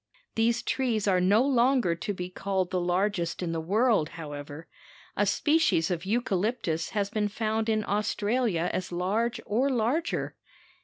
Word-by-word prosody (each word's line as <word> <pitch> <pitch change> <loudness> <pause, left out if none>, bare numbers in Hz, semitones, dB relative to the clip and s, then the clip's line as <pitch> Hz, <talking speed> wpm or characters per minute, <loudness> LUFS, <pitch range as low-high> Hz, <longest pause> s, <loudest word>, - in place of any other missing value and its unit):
These 230 +1 +1
trees 230 -6 0
are 185 -2 +3
no 205 +6 +4
longer 250 -7 +3
to 170 +5 -4
be 180 -2 -4
called 190 0 -2
the 185 -1 0
largest 180 0 0
in 170 - -2
the 165 -1 -2
world, 205 -1 +2
however. 145 0 -8 0.5
A - - +1
species 300 - +2
of 175 0 -2
eucalyptus 200 -6 -1
has 200 -1 0
been 210 -1 0
found 220 +1 -1
in 215 -1 +1
Australia 210 -3 0
as 185 - -3
large 210 +7 0
or 245 +7 +1
larger. 260 +7 -1
205 Hz, 150 wpm, -28 LUFS, 180-235 Hz, 0.5 s, no